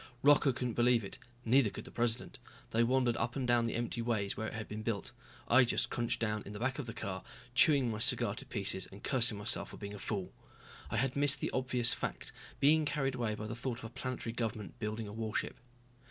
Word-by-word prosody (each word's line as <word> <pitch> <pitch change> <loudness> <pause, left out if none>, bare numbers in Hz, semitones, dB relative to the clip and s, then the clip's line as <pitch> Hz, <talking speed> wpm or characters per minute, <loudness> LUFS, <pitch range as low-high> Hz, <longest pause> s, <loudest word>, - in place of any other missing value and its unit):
Rocca 145 -1 +6
couldn't 125 -1 -2
believe 120 0 +3
it, 95 - -8 0.3
neither 120 0 +5
could - - -8
the - - -10
president. 120 +2 -1 0.3
They 115 - +3
wandered 125 0 +3
up 120 - -1
and 130 -3 -1
down 120 -1 +4
the 115 - -2
empty 120 0 -2
ways 110 -4 0
where 110 - -3
it - - -6
had 110 -1 -5
been 105 +1 -5
built. 110 -2 -2 0.4
I 130 +2 +7
just 120 - 0
crunched 120 -1 0
down 105 -2 -1
in 100 - -8
the 105 - -6
back 130 +4 -1
of 135 - -4
the 115 - -5
car, 95 -3 -4 0.3
chewing 135 -2 +5
my 110 - -4
cigar 120 +1 +3
to 135 - -8
pieces 100 -5 0
and 100 - -12
cursing 120 -5 +1
myself 110 +4 0
for - - -10
being 100 -1 -6
a 105 - -7
fool. 100 -3 -3 0.6
I - - -1
had 130 +2 +1
missed 140 0 +4
the - - -2
obvious 125 -2 +3
fact, - - -4 0.3
being 155 +3 +5
carried 140 -2 0
away 120 -4 -1
by 105 - -6
the 110 - -4
thought 120 +1 -3
of - - -11
a - - -5
planetary 125 -1 -4
government 110 -3 -4
building 110 0 -3
a 100 - -8
warship. 110 0 -2
115 Hz, 230 wpm, -33 LUFS, 110-130 Hz, 0.6 s, I